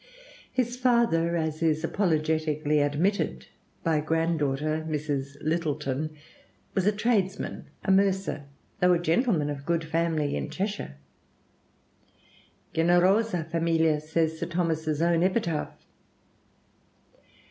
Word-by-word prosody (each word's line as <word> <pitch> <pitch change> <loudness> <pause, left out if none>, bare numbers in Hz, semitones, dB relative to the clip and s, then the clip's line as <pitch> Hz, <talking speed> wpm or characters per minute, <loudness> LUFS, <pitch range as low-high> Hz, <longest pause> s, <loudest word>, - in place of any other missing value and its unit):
His 250 -1 -1
father, 235 -10 +2
as 160 -1 -2
is 155 -1 +1
apologetically 155 -4 +1
admitted 155 +8 0 0.4
by 165 -2 +2
a - - +1
granddaughter, 155 -1 0
Mrs. 145 -2 -3
Littleton, 155 -2 -2 0.6
"was 190 0 +1
a - - +6
tradesman, 205 -3 -1 0.2
a 195 - +2
mercer, 190 -6 +1 0.3
though 180 -1 +5
a 175 - +2
gentleman 170 - +1
of 145 - -5
a - - -11
good 165 +3 0
family 160 -2 0
in - - -3
Cheshire" 200 - -4 1.8
(generosa 175 +4 +3
familia, 165 -2 +2
says 160 +1 -1
Sir 170 - -2
Thomas's 160 -3 -1
own 170 -1 +3
epitaph). 180 -4 -1
165 Hz, 110 wpm, -27 LUFS, 155-185 Hz, 1.8 s, a